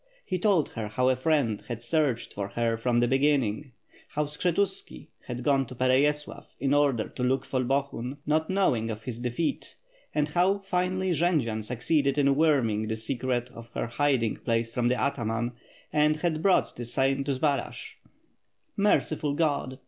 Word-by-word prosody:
He 185 Hz, -2 st, -2 dB
told 180 Hz, -6 st, +2 dB
her 110 Hz, -2 st, -5 dB
how 125 Hz, +5 st, +1 dB
a 130 Hz, -, +3 dB
friend 130 Hz, -6 st, +1 dB
had 120 Hz, -2 st, -5 dB
searched 140 Hz, -3 st, 0 dB
for 100 Hz, -1 st, -3 dB
her 115 Hz, +2 st, 0 dB
from 120 Hz, +1 st, +1 dB
the 120 Hz, -, +3 dB
beginning, 135 Hz, -2 st, +1 dB, 0.3 s
how 150 Hz, 0 st, -1 dB
Skshetuski 180 Hz, +6 st, -2 dB, 0.2 s
had 125 Hz, 0 st, -5 dB
gone 135 Hz, -1 st, +2 dB
to 130 Hz, -, -9 dB
Pereyaslav 140 Hz, +4 st, 0 dB
in 140 Hz, 0 st, +1 dB
order 140 Hz, -6 st, +2 dB
to 125 Hz, -, -5 dB
look 130 Hz, +1 st, +1 dB
for 130 Hz, -1 st, -1 dB
Bohun, 135 Hz, 0 st, -2 dB
not 155 Hz, +2 st, +1 dB
know 190 Hz, -7 st, +3 dB
ing 115 Hz, 0 st, -3 dB
of 110 Hz, 0 st, -5 dB
his 120 Hz, -1 st, -5 dB
defeat, 125 Hz, +6 st, -2 dB, 0.4 s
and 150 Hz, 0 st, +1 dB
how 180 Hz, +5 st, +2 dB
finally 185 Hz, -1 st, -1 dB
Jendzian 145 Hz, -10 st, +1 dB
succeeded 135 Hz, +5 st, 0 dB
in 140 Hz, -1 st, +3 dB
worming 130 Hz, -9 st, +2 dB
the 110 Hz, -, -1 dB
secret 125 Hz, +1 st, -2 dB
of 115 Hz, 0 st, -12 dB
her -, -, -2 dB
hiding 120 Hz, -1 st, +1 dB
place 115 Hz, 0 st, -1 dB
from 120 Hz, 0 st, +1 dB
the 125 Hz, -1 st, +1 dB
ataman, 120 Hz, -2 st, -1 dB, 0.4 s
and 150 Hz, 0 st, +3 dB
had 155 Hz, 0 st, -1 dB
brought 190 Hz, +1 st, +2 dB
the 120 Hz, -, -6 dB
same 135 Hz, +3 st, +1 dB
to 140 Hz, -, 0 dB
Zbaraj. 140 Hz, -1 st, -2 dB, 0.8 s
"Merciful 155 Hz, -7 st, +1 dB
Grod!'' 145 Hz, -5 st, 0 dB
135 Hz, 170 wpm, -27 LUFS, 120-150 Hz, 0.8 s, a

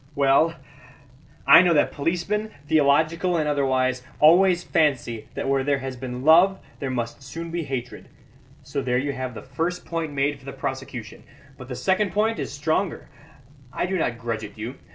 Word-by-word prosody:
Well, 140 Hz, +4 st, +3 dB, 0.9 s
I -, -, +9 dB
know 175 Hz, -2 st, +3 dB
that 145 Hz, -, +3 dB
policemen, 180 Hz, +8 st, -2 dB, 0.2 s
theological 160 Hz, +4 st, +2 dB
and 155 Hz, -2 st, 0 dB
otherwise, 130 Hz, -3 st, +1 dB, 0.2 s
always 175 Hz, +3 st, +5 dB
fancy 125 Hz, -10 st, 0 dB
that -, -, -3 dB
where 135 Hz, 0 st, +1 dB
there 140 Hz, 0 st, +1 dB
has 135 Hz, -1 st, -5 dB
been 125 Hz, 0 st, -6 dB
love 175 Hz, +5 st, +6 dB, 0.2 s
there 135 Hz, -, -3 dB
must 120 Hz, 0 st, -4 dB
soon 165 Hz, +5 st, -7 dB
be 170 Hz, -2 st, -3 dB
hatred; 125 Hz, -2 st, -6 dB, 0.5 s
so 140 Hz, +1 st, -3 dB
there 125 Hz, -2 st, 0 dB
you 140 Hz, +3 st, -1 dB
have 130 Hz, -2 st, -5 dB
the -, -, -8 dB
first 165 Hz, +7 st, -3 dB
point 165 Hz, -2 st, -3 dB
made 140 Hz, 0 st, -1 dB
for 135 Hz, -, -19 dB
the 135 Hz, -, -7 dB
prosecution. 130 Hz, -4 st, -6 dB, 0.3 s
But 130 Hz, -, -11 dB
the 125 Hz, -, -5 dB
second 190 Hz, -, 0 dB
point 220 Hz, +2 st, +1 dB
is -, -, -4 dB
stronger; 155 Hz, +6 st, -2 dB, 0.6 s
I -, -, -2 dB
do 190 Hz, +1 st, -2 dB
not 125 Hz, -9 st, -1 dB
grudge 115 Hz, -1 st, -4 dB
it 105 Hz, 0 st, -9 dB
you. 115 Hz, +5 st, -6 dB
140 Hz, 175 wpm, -24 LUFS, 130-165 Hz, 0.9 s, I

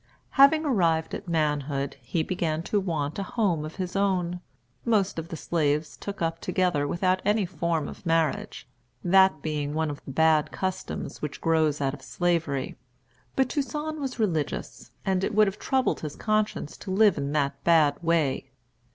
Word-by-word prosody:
Having 310 Hz, +3 st, +6 dB
arrived 170 Hz, -, +1 dB
at 205 Hz, -, -5 dB
manhood, 150 Hz, -4 st, -1 dB
he 160 Hz, +7 st, -1 dB
began 165 Hz, -3 st, -1 dB
to 205 Hz, -, +1 dB
want 160 Hz, -4 st, -2 dB
a 195 Hz, +4 st, -6 dB
home 180 Hz, -9 st, +2 dB
of 155 Hz, +1 st, -7 dB
his 185 Hz, 0 st, -4 dB
own. 180 Hz, -3 st, 0 dB, 0.4 s
Most 205 Hz, -6 st, +1 dB
of 165 Hz, -, -6 dB
the 165 Hz, -, -6 dB
slaves 150 Hz, -1 st, 0 dB
took 200 Hz, -4 st, -5 dB
up 165 Hz, 0 st, -1 dB
together 175 Hz, -7 st, 0 dB
without 185 Hz, +4 st, +1 dB
any 210 Hz, 0 st, +2 dB
form 170 Hz, -3 st, -1 dB
of -, -, -10 dB
marriage, 165 Hz, -6 st, 0 dB, 0.4 s
that 190 Hz, -4 st, +4 dB
being 150 Hz, -1 st, -2 dB
one 160 Hz, -1 st, 0 dB
of 145 Hz, -, -9 dB
the -, -, -10 dB
bad 155 Hz, +2 st, +3 dB
customs 190 Hz, -1 st, -4 dB
which 150 Hz, -1 st, -4 dB
grows 155 Hz, -3 st, +2 dB
out 135 Hz, -1 st, 0 dB
of 140 Hz, -, -9 dB
Slavery. 160 Hz, -3 st, -1 dB, 0.6 s
But 265 Hz, -1 st, +3 dB
Toussaint 300 Hz, +3 st, -3 dB
was 270 Hz, -3 st, -4 dB
religious, 165 Hz, -, -2 dB, 0.2 s
and 190 Hz, -1 st, +1 dB
it 210 Hz, -, -1 dB
would 215 Hz, 0 st, +6 dB
have 195 Hz, +1 st, -3 dB
troubled 265 Hz, -1 st, +1 dB
his 150 Hz, -2 st, -6 dB
conscience 215 Hz, -7 st, -1 dB
to -, -, -9 dB
live 200 Hz, 0 st, +4 dB
in 140 Hz, 0 st, -2 dB
that 140 Hz, -2 st, -1 dB
bad 155 Hz, -3 st, +4 dB
way. 160 Hz, -6 st, +1 dB
170 Hz, 170 wpm, -27 LUFS, 150-195 Hz, 0.6 s, Having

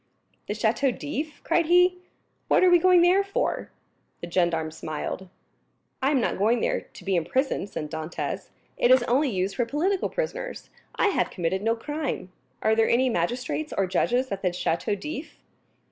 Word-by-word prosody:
"The 205 Hz, -, -2 dB
Château 225 Hz, +5 st, +2 dB
d'If?" 295 Hz, 0 st, -5 dB
cried 335 Hz, -1 st, +2 dB
he, 360 Hz, +1 st, +4 dB, 0.5 s
"what -, -, +4 dB
are 365 Hz, -, +6 dB
we 350 Hz, -, +7 dB
going 360 Hz, 0 st, +5 dB
there 370 Hz, +3 st, +5 dB
for?" 395 Hz, 0 st, -2 dB, 0.5 s
The 175 Hz, -, -7 dB
gendarme 165 Hz, -3 st, +1 dB
smiled. 160 Hz, +4 st, -5 dB, 0.7 s
"I 265 Hz, -, +3 dB
am 285 Hz, -3 st, +3 dB
not 235 Hz, -, -1 dB
going 225 Hz, +4 st, +3 dB
there -, -, 0 dB
to -, -, -15 dB
be 195 Hz, -1 st, +1 dB
imprisoned," 260 Hz, -, 0 dB
said 150 Hz, -1 st, -5 dB
Dantès; 160 Hz, +1 st, -4 dB, 0.3 s
"it 240 Hz, -, +3 dB
is 255 Hz, -1 st, +6 dB
only 265 Hz, +4 st, +2 dB
used 190 Hz, -2 st, -1 dB
for 240 Hz, -, +2 dB
political 355 Hz, +9 st, 0 dB
prisoners. -, -, -4 dB, 0.2 s
I 425 Hz, -, +3 dB
have 390 Hz, -, 0 dB
committed 180 Hz, +1 st, -2 dB
no 225 Hz, +2 st, +1 dB
crime. 290 Hz, -6 st, -4 dB, 0.3 s
Are 220 Hz, -, +3 dB
there 225 Hz, 0 st, +3 dB
any 255 Hz, +2 st, +3 dB
magistrates 245 Hz, -, -2 dB
or 195 Hz, -, +3 dB
judges 245 Hz, +7 st, 0 dB
at 195 Hz, -1 st, -3 dB
the 185 Hz, -, +2 dB
Château 175 Hz, +3 st, -1 dB
d'If?" 300 Hz, +6 st, -6 dB
245 Hz, 175 wpm, -26 LUFS, 190-310 Hz, 0.7 s, we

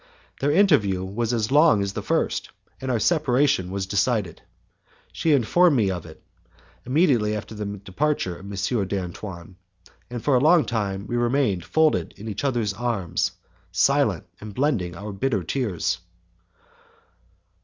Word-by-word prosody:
Their 140 Hz, -, +1 dB
interview 145 Hz, -, +3 dB
was 110 Hz, +5 st, -2 dB
as 115 Hz, -1 st, -1 dB
long 145 Hz, -8 st, +5 dB
as 100 Hz, 0 st, -3 dB
the -, -, -4 dB
first, -, -, -1 dB, 0.3 s
and 130 Hz, -, -4 dB
our 125 Hz, -, +2 dB
separation 135 Hz, -, +2 dB
was 95 Hz, 0 st, -3 dB
decided. 100 Hz, -2 st, 0 dB, 0.7 s
She 160 Hz, -, 0 dB
informed 145 Hz, +4 st, +4 dB
me 100 Hz, -4 st, +2 dB
of 90 Hz, -3 st, -5 dB
it, 80 Hz, -, -14 dB, 0.6 s
immediately 125 Hz, -7 st, +2 dB
after 105 Hz, +1 st, -6 dB
the 105 Hz, -1 st, -5 dB
departure 100 Hz, 0 st, -1 dB
of 95 Hz, -, -12 dB
M. 100 Hz, +1 st, -1 dB
d'Antoine, 90 Hz, -1 st, -6 dB, 0.5 s
and 120 Hz, -2 st, -6 dB
for 145 Hz, -, +2 dB
a -, -, +5 dB
long 160 Hz, +4 st, +5 dB
time 100 Hz, -4 st, -2 dB
we 120 Hz, -, -2 dB
remained 120 Hz, -6 st, +1 dB
folded 155 Hz, -, +1 dB
in 105 Hz, +2 st, -9 dB
each 105 Hz, +3 st, -4 dB
other's 120 Hz, -7 st, 0 dB
arms, 110 Hz, -6 st, -1 dB, 0.4 s
silent, -, -, +2 dB
and 105 Hz, -1 st, -9 dB
blending 115 Hz, -, 0 dB
our 105 Hz, +4 st, -6 dB
bitter 110 Hz, -2 st, -1 dB
tears. 95 Hz, -, -1 dB
110 Hz, 145 wpm, -24 LUFS, 95-135 Hz, 0.7 s, long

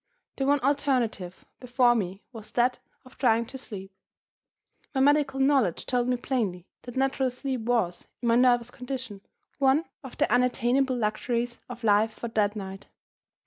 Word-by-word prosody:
The 270 Hz, -, 0 dB
one 285 Hz, 0 st, +4 dB
alternative 255 Hz, -9 st, 0 dB
before 250 Hz, -1 st, +3 dB
me 195 Hz, -3 st, -3 dB
was 220 Hz, -2 st, -9 dB
that 245 Hz, +1 st, +2 dB, 0.3 s
of 255 Hz, -, -18 dB
trying 235 Hz, -2 st, +3 dB
to 265 Hz, -, -8 dB
sleep. 195 Hz, -6 st, -9 dB, 1.0 s
My -, -, +2 dB
medical 280 Hz, -1 st, +3 dB
knowledge 270 Hz, -, +2 dB
told 245 Hz, -1 st, 0 dB
me 250 Hz, 0 st, +1 dB
plainly 215 Hz, -9 st, -2 dB, 0.2 s
that 245 Hz, 0 st, -9 dB
natural 270 Hz, 0 st, +1 dB
sleep 255 Hz, 0 st, -4 dB
was, 220 Hz, -7 st, -1 dB
in 240 Hz, -, -3 dB
my 230 Hz, -, +5 dB
nervous 245 Hz, -1 st, +3 dB
condition, 250 Hz, -6 st, -6 dB, 0.4 s
one 275 Hz, +4 st, +3 dB, 0.2 s
of 265 Hz, -, -10 dB
the -, -, +2 dB
unattainable 250 Hz, +1 st, +2 dB
luxuries 235 Hz, +2 st, -1 dB
of 245 Hz, -1 st, -9 dB
life 215 Hz, +1 st, +3 dB
for 235 Hz, -, -6 dB
that 210 Hz, -1 st, +1 dB
night. 195 Hz, -1 st, -7 dB
245 Hz, 155 wpm, -27 LUFS, 220-265 Hz, 1.0 s, my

